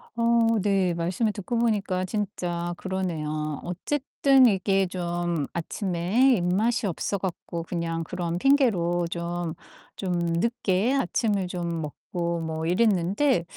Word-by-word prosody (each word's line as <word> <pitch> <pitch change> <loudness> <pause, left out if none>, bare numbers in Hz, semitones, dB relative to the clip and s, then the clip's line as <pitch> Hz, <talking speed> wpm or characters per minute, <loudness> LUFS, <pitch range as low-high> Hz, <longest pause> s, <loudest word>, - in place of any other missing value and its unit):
어 230 -1 +3
네. 190 -3 +2
말씀을 185 +6 0
듣고 225 +3 -3
보니까 205 -5 +1
진짜 175 -4 -3
그러네요. 155 -6 -3
어쨌든 270 - +3
이게 195 -2 +2
좀 175 -4 -2
아침에 190 +8 +1
입맛이 205 +6 +1
없어 195 +3 -2
갖고 170 -2 -4
그냥 165 -1 -3
그런 175 0 -3
핑계로 180 -11 +3
좀 170 -1 -3 0.4
좀 185 -2 -2
늦게 190 +6 +1
아침을 205 -5 0
좀 170 -2 -3
먹고 170 +3 -3
뭐 160 0 -3
이랬는데 195 - +2
180 Hz, 240 characters per minute, -26 LUFS, 170-215 Hz, 0.4 s, 어